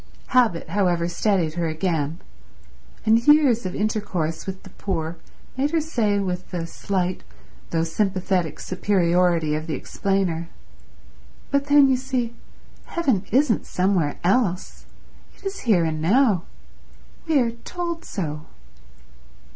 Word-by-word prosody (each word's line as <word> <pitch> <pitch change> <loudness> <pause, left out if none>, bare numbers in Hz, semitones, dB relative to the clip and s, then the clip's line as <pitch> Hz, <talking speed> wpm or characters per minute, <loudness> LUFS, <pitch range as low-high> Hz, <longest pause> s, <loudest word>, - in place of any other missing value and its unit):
Habit, 240 -9 +2
however, 175 -4 +1
steadied 175 -2 +1
her 170 0 -1
again; 160 -1 -1 0.9
and 225 +1 +5
years 275 -8 +5
of 180 - -5
intercourse 200 -7 -2
with 190 0 -6
the 190 - -13
poor 165 -4 -3 0.4
made 270 +3 +1
her 330 +1 +1
say, 235 -10 0
with 185 -2 -3
the 175 -2 -3
slight 185 +1 -2 0.5
though 165 -1 +1
sympathetic 185 -1 0
superiority 175 -4 +1
of 155 +1 -3
the 160 - -2
explainer, 185 -4 -1 1.0
"But 280 0 +2
then, 285 -1 +6
you 260 -1 +3
see, 250 -3 -2 0.5
heaven 260 - 0
isn't 260 -4 +2
somewhere 180 -5 +1
else. 190 -1 0 0.5
It - - -21
is 390 0 -3
here 195 -8 +3
and 155 -1 -2
now. 200 - +3 0.8
We 310 -3 +4
are 235 -2 +1
told 340 +8 -5
so." 155 -6 -5
190 Hz, 125 wpm, -23 LUFS, 170-240 Hz, 1.0 s, then